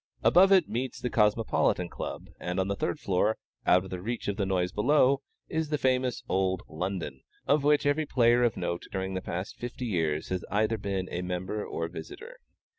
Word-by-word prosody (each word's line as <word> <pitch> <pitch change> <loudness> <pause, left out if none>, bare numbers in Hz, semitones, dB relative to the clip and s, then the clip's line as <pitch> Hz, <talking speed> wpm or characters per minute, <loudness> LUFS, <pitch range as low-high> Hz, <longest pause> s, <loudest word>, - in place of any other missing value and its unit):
Above 190 +3 +6
it 190 -4 +6
meets 125 +2 -3
the 125 - -3
Cosmopolitan 105 -4 +2
Club, - - -6
and 90 +1 -2
on 95 - +1
the 100 - 0
third 85 - -2
floor 100 +3 +1 0.3
out 90 +1 +5
of 95 - -10
reach 120 +3 -3
of 100 - 0
the 100 -2 -1
noise 90 -1 0
below 135 +3 +3 0.3
is 160 -1 -2
the 150 - +1
famous 130 -2 +1
old 95 0 0
"London," 90 -5 -4 0.2
of 145 0 +3
which 150 0 +3
every 145 +2 +1
player 120 -2 +4
of 120 -3 +2
note 85 0 -3
during 95 0 -3
the 95 - -2
past 90 +2 -5
fifty 120 +1 -5
years 80 -8 -1
has 95 -1 -2
either 110 +2 +1
been 95 -2 -2
a 90 - -2
member 90 +3 -3
or 80 - -3
visitor. 415 - -9
105 Hz, 190 wpm, -29 LUFS, 90-130 Hz, 0.3 s, Above